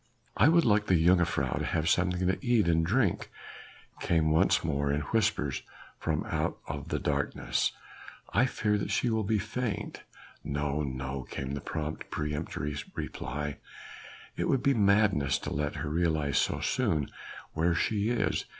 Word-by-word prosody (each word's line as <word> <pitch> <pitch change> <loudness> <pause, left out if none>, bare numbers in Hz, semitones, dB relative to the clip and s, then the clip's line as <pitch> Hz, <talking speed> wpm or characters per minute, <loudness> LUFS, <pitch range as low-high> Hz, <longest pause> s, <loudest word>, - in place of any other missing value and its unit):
"I - - +5
would 170 -1 +4
like 105 -1 +3
the 95 - +4
jongejuffrouw 85 -6 +2
to - - -2
have 80 -1 0
something 90 +1 +2
to 95 +8 -1
eat 120 -6 +3
and 80 -1 +3
drink," 100 +2 +1 0.7
came 80 -2 +2
once 95 +4 +3
more 70 -3 0
in 75 +1 0
whispers 100 - 0 0.4
from 80 -1 -1
out - - -2 0.3
the - - -1
darkness. - - 0 0.6
"I 130 - +4
fear 105 -4 0
that - - -3
she 120 - +1
will 110 -1 +1
be 110 +2 +1
faint!" 110 +1 -3 0.4
"No! 75 0 -1
no!" 65 -1 -3
came 65 +1 -4
the 70 - -4
prompt, 80 0 -4
peremptory 75 -1 -3 0.2
reply, 75 +1 -4 0.8
"it - - -1
would 135 -2 +2
be 140 - +4
madness 100 - +3
to - - -5
let 75 +1 -2
her 75 -1 -3
realize 80 -4 +1
so - - 0
soon 75 -4 +1 0.5
where 85 +2 +2
she 105 +4 +1
is. 120 - 0
85 Hz, 155 wpm, -29 LUFS, 75-105 Hz, 0.8 s, I